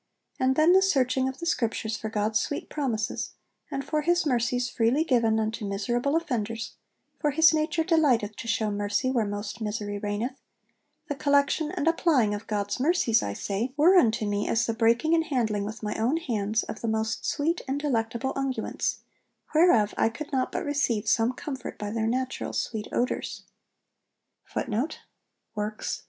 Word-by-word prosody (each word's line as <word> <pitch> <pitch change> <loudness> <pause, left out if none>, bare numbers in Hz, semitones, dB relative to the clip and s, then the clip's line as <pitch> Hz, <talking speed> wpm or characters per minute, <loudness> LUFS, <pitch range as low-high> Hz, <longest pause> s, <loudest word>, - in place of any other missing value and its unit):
And 260 0 +2
then 315 +4 +5
the 380 - +6
searching 265 -8 +2
of 265 - -7
the 340 - -6
Scriptures 225 -7 -1
for 220 0 -4
God's 215 0 +1
sweet 290 - -3
promises, 235 -8 -2 0.4
and 275 - -4
for 305 -1 0
his 345 +2 +2
mercies 245 -2 +1
freely 240 +8 +2
given 230 -7 +2
unto 220 +1 -2
miserable 240 +8 -1
offenders 230 -8 -2 0.5
(for 300 - +1
his 320 +3 +5
nature 315 +1 +1
delighteth 270 - +2
to - - -7
shew 220 -2 0
mercy 205 +5 0
where 230 -5 +1
most 205 +2 -5
misery 210 -1 -3
reigneth) 215 +6 -3 0.7
the 290 - -1
collection 285 +2 +2
and 285 - -2
applying 295 -10 +3
of 205 +2 -6
God's 205 +1 -2
mercies, 270 -6 +3
I 100 - -3
say, 210 - -3
were 340 +6 +6
unto 230 - +4
me 205 0 -1
as 225 -1 +2
the 230 - -1
breaking 235 +7 +2
and 325 -1 +3
handling 220 -8 0
with 220 +2 -7
my 210 - -1
own 245 +8 +1
hands 220 -8 -1
of 215 - -7
the 230 - -2
most 220 0 -1
sweet 320 +4 0
and 270 +2 -1
delectable 250 -2 -1
unguents, 270 -1 -2 0.5
whereof 305 - +4
I - - +4
could 295 +6 -8
not 260 -2 0
but - - -3
receive 255 -7 0
some 225 +3 +3
comfort 265 -1 -6
by 205 -1 -4
their 225 0 -1
natural 255 +2 -2
sweet 215 -2 -3
odours.' 245 - -2
240 Hz, 165 wpm, -27 LUFS, 220-290 Hz, 0.7 s, the